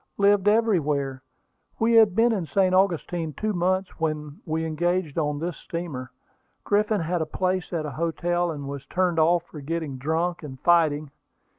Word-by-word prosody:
"Lived 200 0 +3
everywhere; 150 -12 +1 0.6
we 230 +1 +2
had 220 -5 +6
been 235 +1 +4
in 185 -7 -2
St. 185 +5 +2
Augustine 175 -3 +1
two 215 +8 -2
months 185 +1 0
when 150 -2 -3
we 160 +1 -1
engaged 170 0 -1
on 150 -2 -1
this 170 +2 -4
steamer. 155 -7 -6 0.5
Griffin 210 -1 +1
had 170 +1 -1
a - - 0
place 185 +2 -1
at 165 -3 -2
a 150 - -4
hotel, 170 +3 -1
and 145 -4 -5
was 140 -1 -7
turned 180 -2 +1
off 170 +2 +3
for 155 -3 -11
getting 155 -2 -4
drunk, 165 +5 -1
and 135 -4 -9
fighting. 155 -4 +3
170 Hz, 165 wpm, -25 LUFS, 150-185 Hz, 0.6 s, had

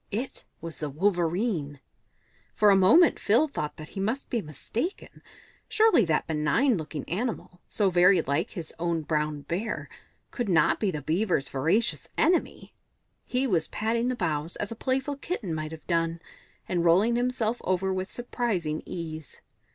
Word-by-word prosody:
It 240 +6 -5 0.2
was 165 0 -6
the 150 - -3
Wolverene. 175 - 0 0.8
For 210 -1 +5
a - - +6
moment 290 - +6
Phil 235 +10 +3
thought 150 - -4
that 155 -1 -9
he - - -7
must 225 +8 -2
be 235 - 0
mistaken; 215 - -5 0.5
surely 435 - +4
that 160 -2 +1
benign 160 - +2
looking 155 -4 -5
animal, 195 -2 -4
so 200 -3 +1
very 180 +1 +5
like 145 +8 -1
his 170 -5 -7
own 170 -1 -1
brown 150 -1 -1
bear, 175 +10 -4 0.4
could 240 -5 -3
not 170 -3 +3
be 210 - +1
the 150 -6 -4
Beaver's 170 -2 0
voracious 155 - 0
enemy? 345 +2 +1 0.5
He 255 +2 0
was 175 -10 +1
patting 230 +2 -1
the 255 - 0
boughs 155 -5 -2
as 205 - -4
a - - -4
playful 265 +4 -1
kitten 260 - -4
might 155 0 -4
have 160 -1 -10
done, 165 -1 0 0.5
and 175 -2 0
rolling 190 +8 +4
himself 245 -1 0
over 190 +1 0
with 185 +1 -3
surprising 210 -11 -2
ease. 160 -4 -7
185 Hz, 160 wpm, -27 LUFS, 160-235 Hz, 0.8 s, a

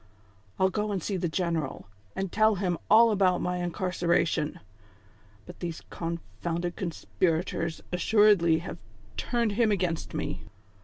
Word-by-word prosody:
I'll 190 0 +3
go 210 +1 -1
and 190 -5 -2
see 200 - -2
the 175 -2 -1
general, 165 -5 -2 0.3
and 190 -2 -3
tell 215 0 +4
him 180 -3 -1
all 230 +1 +7
about 185 -3 +3
my 180 0 -1
incarcera 175 -1 +1
tion; 150 -2 -2 0.9
but - - -11
these 170 -2 -5
confounded 170 +1 -4
conspirators 170 -1 -1
assuredly 185 -3 +4
have - - -6 0.4
turned 235 - 0
him 215 +1 +2
against 180 -5 -1
me. - - -3
180 Hz, 135 wpm, -28 LUFS, 170-200 Hz, 0.9 s, all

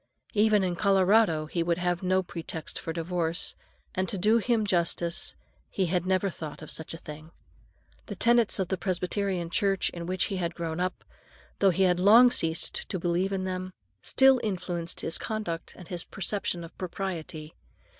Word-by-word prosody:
Even 210 -2 +4
in 180 -2 0
Colorado 195 -3 +3
he 170 +2 -2
would 170 0 +1
have 175 -1 0
had 185 - -5
no 185 0 +3
pretext 165 -2 -6
for 165 - -4
divorce, 165 0 -1 0.4
and, 185 0 -1
to 200 - -1
do 215 +5 +4
him 230 -1 +1
justice, 170 -2 0 0.3
he 190 - 0
had 180 +1 -1
never 190 +1 +1
thought 155 -2 -8
of 155 - -6
such 160 +1 -5
a - - -7
thing. 155 0 -10 0.8
The - - -5
tenets 235 -2 +3
of 190 -3 -1
the 190 - 0
Presbyterian 185 -1 -1
Church 195 +1 +1
in 170 -1 -7
which 185 0 0
he 195 - -2
had 170 -1 -2
grown 165 -1 -4
up, 185 +1 -2 0.6
though 195 - +5
he 190 +1 +2
had 180 -1 +3
long 230 +6 +7
ceased 165 -3 -1
to 185 - -2
believe 175 +2 0
in 190 -1 -1
them, 185 0 -4 0.3
still 265 -2 +5
influenced 175 -4 -3
his 165 - +2
conduct 210 -7 -3
and 180 - -11
his 175 -2 -3
conception 195 -2 -3
of 165 - -11
propriety. 170 -4 -5
180 Hz, 180 wpm, -28 LUFS, 170-195 Hz, 0.8 s, long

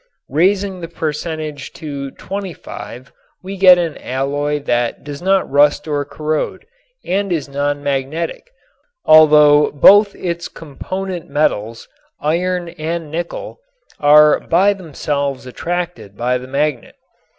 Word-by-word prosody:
Raising 190 +3 +1
the 165 - -5
percentage 155 -2 -5
to 140 -3 -6
25 170 -8 -8 0.3
we 195 +1 -6
get 185 -2 +7
an 170 -3 -2
alloy 145 +3 -2
that 120 -2 -1
does 145 0 -8
not 190 +1 +2
rust 145 +2 +3
or 145 -1 -1
corrode 155 - -3 0.4
and 195 +1 -1
is 155 -5 -1
non 145 +1 -2
magnetic, 145 - -3 0.6
although 150 -1 +6
both 200 +8 +6
its 170 -1 -4
component 180 +4 -6
metals, 115 -6 -1 0.3
iron 175 +3 -1
and 165 -1 -5
nickel, 170 - -5 0.4
are 150 +1 +6
by 190 +5 +2
themselves 145 -7 -4
attracted 170 - -5
by 125 +1 0
the 125 - -10
magnet. 140 -1 -2
150 Hz, 115 wpm, -17 LUFS, 140-175 Hz, 0.6 s, get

